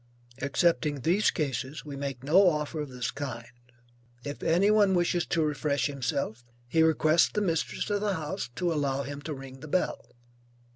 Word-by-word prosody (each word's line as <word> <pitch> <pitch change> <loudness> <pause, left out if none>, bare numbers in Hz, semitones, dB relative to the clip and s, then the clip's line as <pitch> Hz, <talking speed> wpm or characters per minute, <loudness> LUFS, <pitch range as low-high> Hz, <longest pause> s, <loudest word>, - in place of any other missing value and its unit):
Excepting 150 0 +1
these 180 - +3
cases, 145 -1 -3
we 145 -2 -6
make 135 -2 -5
no 180 +7 +6
offer 150 0 -2
of 150 - -5
this 125 -2 -3
kind. 135 -5 -5 0.8
If 145 0 -5
any 180 +6 +3
one 205 -3 +4
wishes 175 0 +1
to 165 -2 +1
refresh 145 -3 0
himself, 125 -4 -2 0.2
he 160 +6 +2
requests 160 0 +4
the - - -1
mistress 165 -6 -1
of 205 0 0
the 205 -2 0
house 160 -1 -4
to 175 -2 0
allow 140 -2 0
him 145 +1 -6
to 150 +1 -5
ring 135 0 -10
the 155 - -9
bell. 180 -3 -2
150 Hz, 175 wpm, -28 LUFS, 140-175 Hz, 0.8 s, no